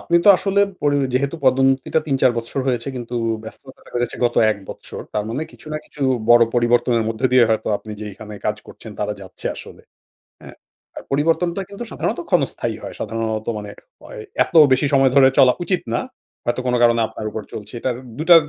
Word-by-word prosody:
আপনি 170 Hz, -, +1 dB
তো -, -, +6 dB
আসলে 200 Hz, 0 st, +1 dB, 0.2 s
পরি 145 Hz, -1 st, +2 dB, 0.2 s
যেহেতু 140 Hz, +5 st, 0 dB
পদোন্নতিটা 135 Hz, +3 st, +3 dB
৩-৪বছর 130 Hz, -3 st, 0 dB
হয়েছে 120 Hz, 0 st, -1 dB
কিন্তু 120 Hz, 0 st, -6 dB, 0.3 s
ব্যস্ততাটা 130 Hz, +4 st, -13 dB
বেড়েছে 120 Hz, -1 st, -1 dB
গত 120 Hz, -, +1 dB, 0.2 s
১ 105 Hz, -, -1 dB
বছর। -, -, -8 dB
তার 105 Hz, -1 st, 0 dB
মানে, 135 Hz, +7 st, -2 dB
কিছু -, -, -17 dB
না 155 Hz, -, -2 dB
কিছু 145 Hz, -, -8 dB, 0.3 s
বড় 120 Hz, 0 st, +8 dB
পরিবর্তনের 120 Hz, -1 st, +2 dB
মধ্যে 115 Hz, +3 st, 0 dB
দিয়ে 125 Hz, -2 st, +7 dB
হয়তো 110 Hz, 0 st, 0 dB
আপনি 110 Hz, -, -9 dB
যেইখানে 105 Hz, 0 st, -8 dB
কাজ 105 Hz, 0 st, 0 dB
করছেন, 110 Hz, -, -11 dB
তারা 105 Hz, 0 st, -1 dB
যাচ্ছে 95 Hz, -, -7 dB
আসলে। -, -, -10 dB, 0.6 s
হ্যাঁ? -, -, -12 dB, 0.4 s
আর -, -, -6 dB
পরিবর্তনটা 165 Hz, +6 st, +1 dB
কিন্তু 200 Hz, +4 st, -7 dB
সাধারণত -, -, -2 dB
ক্ষণস্থায়ী -, -, 0 dB
হয়। -, -, -6 dB
সাধারণত 110 Hz, 0 st, -3 dB
মানে, 105 Hz, -1 st, -7 dB, 0.3 s
ওয় -, -, -10 dB, 0.2 s
এত -, -, -12 dB, 0.2 s
বেশি 130 Hz, +3 st, +3 dB
সময় 135 Hz, -1 st, +5 dB
ধরে 135 Hz, -1 st, +7 dB
চলা 125 Hz, -1 st, +7 dB
উচিত 180 Hz, 0 st, 0 dB
না। 120 Hz, -, +1 dB, 0.5 s
হয়তো 120 Hz, +2 st, -1 dB
কোন 125 Hz, -, +2 dB
কারণে 120 Hz, -1 st, +4 dB
আপনার 110 Hz, -, -8 dB
উপর 110 Hz, -, -4 dB
চলছে। 105 Hz, +3 st, -8 dB
এটার 125 Hz, 0 st, -1 dB, 0.2 s
২টা 170 Hz, +2 st, +7 dB
125 Hz, 180 wpm, -20 LUFS, 110-140 Hz, 0.6 s, বড়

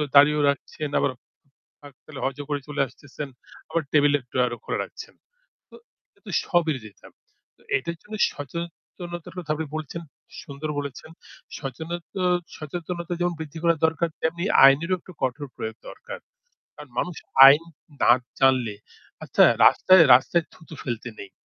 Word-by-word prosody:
দাড়িও 150 Hz, +1 st, +7 dB
রাখছেন 145 Hz, +1 st, -4 dB
আবার 140 Hz, -, +1 dB, 0.7 s
ফাক 145 Hz, -2 st, -13 dB
পেলে 145 Hz, -3 st, -10 dB
হজও 135 Hz, +2 st, -3 dB
করে 145 Hz, -1 st, -1 dB
চলে 150 Hz, -1 st, -2 dB
আসতেছেন। 145 Hz, +2 st, -9 dB, 0.4 s
আবার 165 Hz, -, -1 dB
টেবল 145 Hz, -1 st, +4 dB
এর 140 Hz, -, -13 dB
ড্রয়ারও 125 Hz, -1 st, 0 dB
খোলা -, -, -2 dB
রাখছেন। -, -, -11 dB, 0.6 s
তো -, -, -15 dB, 0.4 s
এটা -, -, -11 dB
স্ববিরোধিতা। 150 Hz, -, -2 dB, 0.5 s
তো -, -, -28 dB, 0.2 s
এটার 170 Hz, +5 st, -5 dB
জন্য 215 Hz, -, -8 dB, 0.2 s
সচেতনতার 170 Hz, +4 st, -8 dB
কথা 165 Hz, -4 st, -10 dB
আপনি 160 Hz, 0 st, -4 dB
বলেছেন, 155 Hz, +2 st, -5 dB, 0.4 s
সুন্দর 140 Hz, +2 st, -6 dB
বলেছেন। 140 Hz, +1 st, -7 dB, 0.5 s
সচেনতা 160 Hz, +5 st, -5 dB, 0.6 s
সচেতনতা 170 Hz, +3 st, -5 dB
যেমন 175 Hz, 0 st, 0 dB
বৃদ্ধি 160 Hz, 0 st, -7 dB
করা 170 Hz, -1 st, +4 dB
দরকার 160 Hz, +1 st, 0 dB
তেমনি 170 Hz, +2 st, -1 dB, 0.2 s
আইনেরও 165 Hz, +7 st, +4 dB
একটু 185 Hz, -, -14 dB
কঠোর 130 Hz, +3 st, -2 dB
প্রয়োগ 110 Hz, 0 st, -5 dB
দরকার। -, -, -9 dB, 0.6 s
কারণ 150 Hz, -3 st, -12 dB
মানুষ 180 Hz, -3 st, -2 dB, 0.3 s
আইন 145 Hz, +4 st, +7 dB, 0.4 s
না -, -, +7 dB, 0.3 s
জানলে 130 Hz, -5 st, +3 dB, 0.5 s
আচ্ছা -, -, +3 dB, 0.2 s
রাস্তায় 185 Hz, -2 st, +6 dB
রাস্তায় 160 Hz, +6 st, +3 dB
থুতু 160 Hz, 0 st, -13 dB
ফেলতে 120 Hz, -1 st, -4 dB
নেই। 100 Hz, -, -10 dB
150 Hz, 140 wpm, -24 LUFS, 135-170 Hz, 0.7 s, দাড়িও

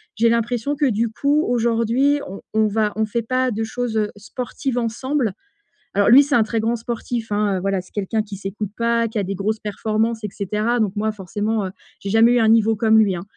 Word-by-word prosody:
j'ai 230 Hz, +1 st, +3 dB
l'impression 235 Hz, +4 st, 0 dB
que 290 Hz, -, +1 dB
du 230 Hz, 0 st, 0 dB
coup 285 Hz, +7 st, +1 dB
aujourd'hui 235 Hz, +4 st, +2 dB
on 195 Hz, -, -8 dB
on 220 Hz, 0 st, +3 dB
va 210 Hz, 0 st, 0 dB
on 220 Hz, -, +2 dB
fait 230 Hz, +2 st, -2 dB
pas 255 Hz, +2 st, 0 dB
de 225 Hz, 0 st, -2 dB
choses, 235 Hz, 0 st, -3 dB
heu, 210 Hz, -1 st, 0 dB
sportives 250 Hz, +4 st, -4 dB
ensemble. 240 Hz, 0 st, -1 dB, 0.6 s
Alors 205 Hz, -, +4 dB
lui 275 Hz, +4 st, +8 dB
c'est 285 Hz, +1 st, -1 dB
un 230 Hz, -, +5 dB
très 225 Hz, +1 st, -2 dB
grand 225 Hz, +2 st, 0 dB
sportif, 230 Hz, 0 st, -4 dB
hein, 205 Hz, -2 st, +1 dB
heu, -, -, -4 dB
voilà 195 Hz, 0 st, 0 dB
c'est 185 Hz, -, -21 dB
quelqu'un 205 Hz, +2 st, -1 dB
qui 210 Hz, -1 st, -9 dB
s'écoute 195 Hz, +1 st, -5 dB
pas, 230 Hz, 0 st, +1 dB
qui 225 Hz, -, -12 dB
a -, -, +1 dB
des 195 Hz, +1 st, -4 dB
grosses 215 Hz, +3 st, -2 dB
performances 220 Hz, +2 st, -1 dB
et -, -, -1 dB
cetera, 210 Hz, +5 st, -1 dB
donc 210 Hz, -2 st, 0 dB
moi 215 Hz, +1 st, 0 dB
forcément, 205 Hz, +2 st, -2 dB
heu, -, -, -5 dB, 0.3 s
j'ai 195 Hz, -, -5 dB
jamais 225 Hz, +3 st, +5 dB
eu 245 Hz, -, +3 dB
un 220 Hz, -, +3 dB
niveau 225 Hz, 0 st, +4 dB
comme 220 Hz, +1 st, +4 dB
lui, 205 Hz, -4 st, +3 dB
hein, 170 Hz, -, -6 dB
220 Hz, 230 wpm, -21 LUFS, 210-235 Hz, 0.6 s, lui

